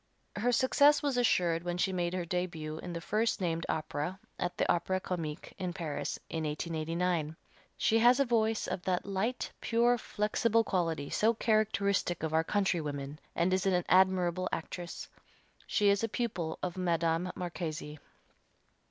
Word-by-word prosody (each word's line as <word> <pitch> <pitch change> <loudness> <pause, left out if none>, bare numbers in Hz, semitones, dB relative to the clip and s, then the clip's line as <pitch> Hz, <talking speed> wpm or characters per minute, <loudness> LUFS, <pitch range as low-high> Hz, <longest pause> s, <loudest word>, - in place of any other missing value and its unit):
Her 235 +4 +1
success 285 +5 +4
was 285 -3 +1
assured 175 -9 +2
when 175 0 -3
she 190 +1 +1
made 175 0 -1
her 180 -2 -2
début 165 -3 -3
in 175 - -6
the 170 - -3
first 220 +6 0
named 165 -3 -1
opera 155 +3 -2 0.2
at 175 - -2
the - - +1
Opera 185 +2 +1
Comique, 165 -5 -5
in 180 -2 -2
Paris, 150 -5 -3
in 160 -1 -3
1889. 160 +1 -1 0.4
She 225 - +3
has 245 +3 +6
a 275 - +4
voice 225 -2 +1
of - - -3
that 180 -1 -1
light, 200 +6 -2
pure, 235 +1 +3
flexible 220 +2 +1
quality 165 -7 -1
so 225 +2 +3
characteristic 200 -6 +1
of 160 -1 -2
our 160 0 +3
countrywomen, 150 -7 -1 0.2
and 175 +2 +2
is 190 +1 +1
an 180 -2 +2
admirable 185 -1 +3
actress. 175 +1 -5 0.6
She 205 -1 +3
is 200 +2 +2
a 225 - 0
pupil 185 -9 -2
of 180 0 -3
Madame 170 0 +1
Marchesi. 160 -4 -5
180 Hz, 155 wpm, -31 LUFS, 165-210 Hz, 0.6 s, has